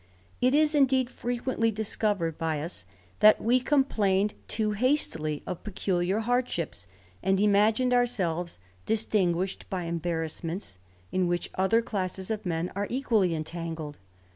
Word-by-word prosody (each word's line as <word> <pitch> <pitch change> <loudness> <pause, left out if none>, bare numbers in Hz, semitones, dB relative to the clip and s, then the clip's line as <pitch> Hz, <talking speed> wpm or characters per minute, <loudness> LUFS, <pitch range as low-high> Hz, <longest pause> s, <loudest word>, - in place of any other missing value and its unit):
It 255 +2 +4
is, 305 0 +4
indeed, 265 -3 +3
frequently 245 -1 -1
discovered 205 -5 -1
by 160 -2 -1
us, 150 - -5 0.3
that 215 0 +7
we 245 +3 +3
com 275 +2 +3
plained 205 -5 +1
too 215 -1 0
hastily 200 - 0
of 180 - -5
peculiar 190 0 0
hardships, 225 - -1 0.3
and 190 0 +2
imagined 215 +5 +3
ourselves 180 - 0 0.3
distinguished 195 -4 0
by 185 -2 -2
embarrassments, 165 - -3 0.3
in 185 -1 +1
which 175 0 -2
other 220 +5 +2
classes 190 -1 -3
of 215 -3 -3
men 165 +1 -1
are 200 0 -1
equally 225 -9 +1
entangled. 160 -1 -5
200 Hz, 130 wpm, -28 LUFS, 170-230 Hz, 0.3 s, that